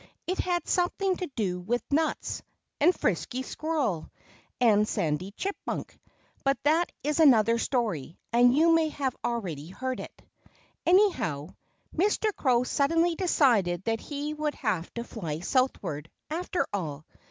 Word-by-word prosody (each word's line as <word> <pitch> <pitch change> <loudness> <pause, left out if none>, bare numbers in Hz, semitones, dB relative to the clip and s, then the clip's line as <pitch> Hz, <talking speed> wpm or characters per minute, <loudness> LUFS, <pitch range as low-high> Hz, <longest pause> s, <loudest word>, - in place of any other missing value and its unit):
It 370 +2 -2
had 350 -2 0
something 370 +1 +1
to 365 - -3
do 185 -6 -1
with 230 +7 -1
nuts, 315 +2 0 0.4
and 320 +5 +6
Frisky 260 -7 -1
Squirrel, 285 - -2 0.5
and 215 -4 +4
Sandy 155 +2 -1
Chipmunk. 395 - -4 0.5
But 275 0 +2
that 320 +4 +3
is 300 +2 0
another 230 -6 +6
story; 210 - -1 0.2
and 245 +2 +5
you 330 +2 +5
may 320 -1 +3 0.3
already 180 -11 -3
have 185 - -13
heard 260 0 -2
it. - - -9 0.7
Anyhow, 340 - +3 0.5
Mr. 415 +4 +1
Crow 250 -3 +2
suddenly 330 +6 +2
decided 235 - +2
that 225 +1 0
he 295 +1 -4
would 300 -1 -2
have 200 - -2
to 235 - -3
fly 165 -10 -5
southward, 180 - 0 0.2
after 355 +2 -1
all. 155 -6 -3
255 Hz, 135 wpm, -28 LUFS, 195-320 Hz, 0.7 s, and